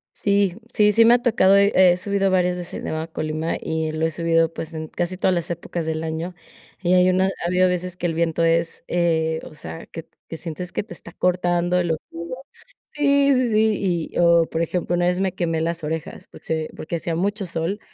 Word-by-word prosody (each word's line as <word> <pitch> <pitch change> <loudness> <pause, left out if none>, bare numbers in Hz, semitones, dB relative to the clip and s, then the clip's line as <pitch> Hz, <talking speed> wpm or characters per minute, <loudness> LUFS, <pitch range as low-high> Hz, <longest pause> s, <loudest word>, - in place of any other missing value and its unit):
Sí. 200 -3 +1 0.2
Sí, 210 -2 +4
sí 230 +2 +5
me 235 - +7
ha 245 - 0
tocado. 205 -6 +4
He 200 +1 +4 0.2
he - - -3
subido 195 +1 0
varias 180 -1 +2
veces, 175 -1 -7
el - - -6
Nevado 160 0 -3
de 165 - -19
Colima, 155 +1 -2
y 160 -1 -2
lo 155 +1 -1
he 165 - 0
subido, 165 0 +1
pues 165 0 -6
en 160 0 -5
casi 175 +3 -3
todas 185 - +2
las 170 -2 -3
épocas 170 0 -4
del 160 0 -2
año. 160 +3 -4 0.5
Y 180 -1 +2
hay 180 0 +5
una 185 +1 +3
ha 195 -2 -4
habido 180 +1 +3
veces 180 0 -2
que 175 - -4
el 165 - -2
viento 165 0 0
es, 165 0 +1
eh, 160 -2 +1
o - - -10
sea, 80 - -9
que - - -8
t - - -41
que - - -6
sientes 175 +2 -6
que - - -1
te 190 - -11
está - - -11
cortando 175 0 +1
de 180 - +1
lo 165 -2 +1
frío. 170 +6 -6 0.6
Sí, 280 -1 +3
sí, 255 -2 +2
sí. 205 -6 +1
Y - - -5
o 170 -1 +5
por 160 - -3
ejemplo, 175 +1 -1
una 175 0 +1
vez 180 +1 +1
me 190 -2 0
quemé 165 -2 -1
las 165 0 -2
orejas, 160 +3 -5
porque - - -16
se 160 -1 -2
porque 160 +2 -5
hacía 165 0 -3
mucho 200 +4 -1
sol. 170 +4 -3
175 Hz, 235 wpm, -22 LUFS, 165-185 Hz, 0.6 s, me